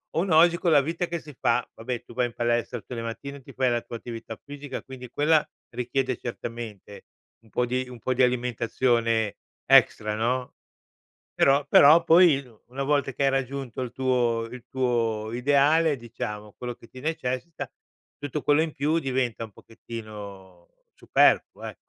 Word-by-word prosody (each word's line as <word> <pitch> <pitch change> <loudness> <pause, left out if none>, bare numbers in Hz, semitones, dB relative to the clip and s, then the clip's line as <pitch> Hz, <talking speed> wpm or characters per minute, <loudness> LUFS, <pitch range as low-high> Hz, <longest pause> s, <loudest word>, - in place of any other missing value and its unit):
uno 170 0 +2
oggi 170 +1 +6
con 175 -1 +1
la 145 -2 +6
vita 165 +5 -2
che 170 0 -3
si 150 -3 -13
fa 120 0 +1
vabbè, 120 +1 -5
tu - - -14
vai 125 0 +2
in 120 - -12
palestra 120 +1 -1
tutte 125 - -9
le 115 - -4
mattine, 140 +5 -7
ti - - -13
fai 130 -1 +1
la 120 0 0
tua 115 - -7
attività 115 -1 -8
fisica, 145 -1 -7
quindi, 130 -2 -10
quella 150 +2 +3 0.2
richiede 130 0 -1
certamente 115 -4 -7 0.4
un 110 - -22
po' 125 - +1
di 130 +1 -1
un 125 -1 -10
po' 130 - -1
di 130 +1 +3
alimentazione 120 -2 +1 0.3
extra, 105 0 +4
no, 125 +3 -1 0.8
però 140 +1 +4
però, 155 +4 +7
poi, 165 -4 +5 0.2
una 130 +3 -4
volta 140 -1 +1
che 135 - -3
hai 135 - +4
raggiunto 135 -2 -3
il 125 - -5
tuo 120 -3 +1
il 125 -1 -10
tuo 115 -4 -1
ideale, 145 +5 +3
diciamo, 105 -3 -7
quello 125 -1 -5
che 115 - -18
ti 130 - -13
necessita, 150 +1 -3 0.5
tutto 145 0 -4
quello 145 +1 +3
in 160 -1 -3
più 150 +4 +1
diventa 130 -6 -1
un 110 - -12
pochettino 100 -6 -10 0.3
superfluo, - - +2
ecco. - - -6
125 Hz, 170 wpm, -26 LUFS, 115-140 Hz, 0.8 s, però